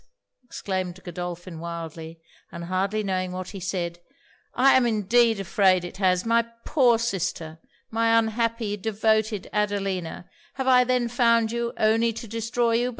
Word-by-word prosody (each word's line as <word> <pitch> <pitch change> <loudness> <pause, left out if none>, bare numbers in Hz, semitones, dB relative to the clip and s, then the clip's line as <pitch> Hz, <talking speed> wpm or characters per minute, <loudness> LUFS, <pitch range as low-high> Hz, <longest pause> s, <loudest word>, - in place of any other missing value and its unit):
exclaimed 185 -6 -4
Godolphin 175 -1 -6
wildly, 165 -1 -7 0.3
and 170 - -7
hardly 190 +4 -1
knowing 185 -2 -2
what 185 0 -5
he 195 - -8
said 175 -1 -3 0.6
'I 270 +2 +5
am 250 -2 +3
indeed 225 +1 +2
afraid 190 -1 +2
it 175 - -9
has! 185 -1 +2
My 230 0 +4 0.2
poor 250 -6 +4
sister 175 -7 -3 0.3
my 230 0 +3
unhappy, 230 -1 0
devoted 220 0 0
Adelina! 195 -5 -2 0.3
have 265 - -3
I 250 -1 +6
then 250 -1 +1
found 230 -2 +2
you 235 0 -2
only 225 +2 +2
to 230 +1 -8
destroy 230 +2 -1
you? 245 +1 0
210 Hz, 145 wpm, -25 LUFS, 185-230 Hz, 0.6 s, I